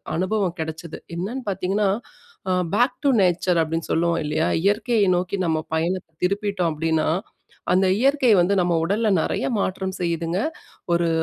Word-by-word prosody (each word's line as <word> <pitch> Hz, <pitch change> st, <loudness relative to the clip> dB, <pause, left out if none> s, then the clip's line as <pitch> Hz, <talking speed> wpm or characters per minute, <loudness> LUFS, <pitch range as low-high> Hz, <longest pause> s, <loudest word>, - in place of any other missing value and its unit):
அனுபவம் 185 Hz, +1 st, -1 dB
கெடைச்சுது. 160 Hz, +1 st, -5 dB, 0.2 s
என்னன்னு 215 Hz, +10 st, -4 dB
பார்த்தீங்கன்னா, 195 Hz, +2 st, 0 dB, 0.6 s
அ -, -, +2 dB, 0.2 s
பேக் 245 Hz, +3 st, +2 dB
டூ 285 Hz, -, +4 dB
நேச்சர், 180 Hz, -1 st, +2 dB
அப்படின்னு 165 Hz, +1 st, -2 dB
சொல்லுவோம் 170 Hz, 0 st, +1 dB
இல்லையா? 150 Hz, +2 st, 0 dB, 0.2 s
இயற்கையை 210 Hz, +2 st, +2 dB
நோக்கி 180 Hz, +2 st, -1 dB
நம்ம 160 Hz, -2 st, +1 dB
பயணத்தை 170 Hz, +2 st, -1 dB
திருப்பிட்டோம் 200 Hz, -2 st, 0 dB
அப்படின்னா, 160 Hz, 0 st, 0 dB, 0.7 s
அந்த 190 Hz, +1 st, +3 dB
இயற்கை 270 Hz, -1 st, +3 dB
வந்து 190 Hz, +3 st, +2 dB
நம்ம 175 Hz, -1 st, +1 dB
உடல்ல 215 Hz, +5 st, +1 dB
நெறைய -, -, -1 dB
மாற்றம் 190 Hz, 0 st, -2 dB
செய்யுதுங்க. 170 Hz, +1 st, -1 dB, 0.5 s
ஒரு 170 Hz, 0 st, +2 dB
180 Hz, 140 wpm, -23 LUFS, 165-200 Hz, 0.7 s, டூ